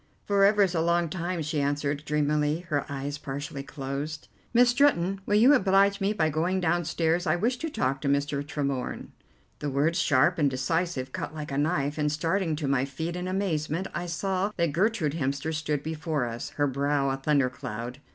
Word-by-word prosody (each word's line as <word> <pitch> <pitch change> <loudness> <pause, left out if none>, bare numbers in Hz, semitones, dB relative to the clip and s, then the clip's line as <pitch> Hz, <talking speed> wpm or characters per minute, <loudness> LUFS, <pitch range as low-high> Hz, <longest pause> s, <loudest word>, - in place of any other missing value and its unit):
"For 200 -1 +3
ever 205 0 +5
is 185 -2 +1
a 165 - +1
long 170 0 +2
time," 175 -1 -3
she 150 -1 -1
answered 145 +1 -1
dreamily, 150 +1 +1
her 145 -1 -1
eyes 140 +1 -4
partially 140 0 -5
closed. 140 +2 -5 0.2
"Miss 245 +1 +5
Stretton, 195 -8 +2
will 205 - +2
you 240 +7 +7
oblige 200 -4 +3
me 195 +1 +2
by 165 -7 +1
going 170 +5 0
downstairs; 175 0 0
I 155 - +3
wish 235 +8 0
to 325 - -3
talk 135 - -1
to 145 - -2
Mr. 140 0 0
Tremorne." 140 -3 -3 0.5
The 145 - -2
words, 150 +6 +1
sharp 150 +5 +3
and 145 -2 +4
decisive, 135 +1 -1
cut 150 - -5
like 150 -2 -6
a 135 - -2
knife, 145 -1 0
and, 150 0 +1
starting 165 +2 0
to 150 -2 -3
my 135 -1 +2
feet 160 +5 -4
in 180 0 -4
amazement, 185 -2 -1
I 175 +3 -3
saw 190 +4 -1
that 170 -3 +1
Gertrude 185 -4 +1
Hemster 140 +1 -2
stood 150 -2 -2
before 155 -3 -2
us, 120 0 -5
her 145 - +2
brow 140 0 0
a 135 - -1
thundercloud. 130 -4 -1
155 Hz, 190 wpm, -27 LUFS, 140-180 Hz, 0.5 s, you